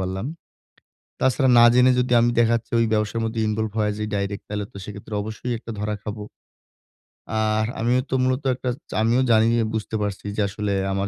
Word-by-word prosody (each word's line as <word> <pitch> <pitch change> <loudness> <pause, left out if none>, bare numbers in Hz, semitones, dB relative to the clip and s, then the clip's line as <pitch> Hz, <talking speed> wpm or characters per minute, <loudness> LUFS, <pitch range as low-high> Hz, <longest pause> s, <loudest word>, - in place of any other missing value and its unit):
পারলাম। 95 +3 -3 0.9
তাছাড়া 130 0 +3
না 120 - +8
জেনে 125 +1 +6
যদি 125 0 -1
আমি 120 +1 +3
দেখাচ্ছি 115 0 +1
ওই 115 - +3
ব্যবসার 105 +1 0
মধ্যে 110 0 -2
ইনভলভ 110 0 -1
হয়া 105 -1 +1
যাই 105 0 -3
ডাইরেক্ট 100 0 -2
তালে 105 0 -3
তো - - -13
সেক্ষেত্রে 105 +1 -8
অবশ্যই 110 +3 -5
একটা 115 - -10
ধরা 105 0 -2
খাবো। 105 0 -6 1.2
আহ 110 0 +1 0.2
আমিও 125 +2 +2
তো 130 - 0
মূলত 130 +2 0
একটা 130 0 -4 0.2
আমিও 115 +4 +2
জানি 110 0 +5
যে - - +2
বুঝতে 110 0 -3
পারছি 100 -1 -3
যে - - +2
আসলে 105 0 -2 0.2
আমার 100 +1 -1
110 Hz, 185 wpm, -23 LUFS, 105-120 Hz, 1.2 s, না